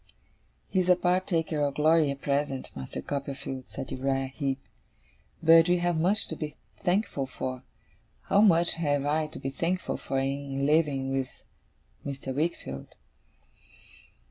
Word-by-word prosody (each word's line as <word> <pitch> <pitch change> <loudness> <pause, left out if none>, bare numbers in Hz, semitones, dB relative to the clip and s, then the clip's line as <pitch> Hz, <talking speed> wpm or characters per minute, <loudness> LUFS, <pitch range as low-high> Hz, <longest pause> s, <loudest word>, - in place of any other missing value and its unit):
'He 190 - +1
is 185 0 +1
a 180 - +8
partaker 175 -3 +1
of 145 -1 0
glory 155 0 +4
at 140 0 -4
present, 140 -1 -1
Master 65 0 -6
Copperfield,' 135 -2 -4
said 135 - -6
Uriah 135 0 -1
Heep. 135 -2 -1 0.9
'But 165 +1 +7
we 180 - +4
have 175 -2 +1
much 190 +6 +2
to 160 - -3
be 150 -1 -5 0.3
thankful 180 -7 +1
for. 130 0 -4 0.6
How 200 - +4
much 175 -5 +5
have 145 -4 0
I 155 +1 +1
to 150 - -9
be 135 - -4
thankful 175 +5 -1
for 135 - -3
in 135 0 -1
living 145 -3 +2
with 135 -1 -3 0.6
Mr. 135 -1 -4
Wickfield! 140 - -3
145 Hz, 145 wpm, -28 LUFS, 135-165 Hz, 0.9 s, a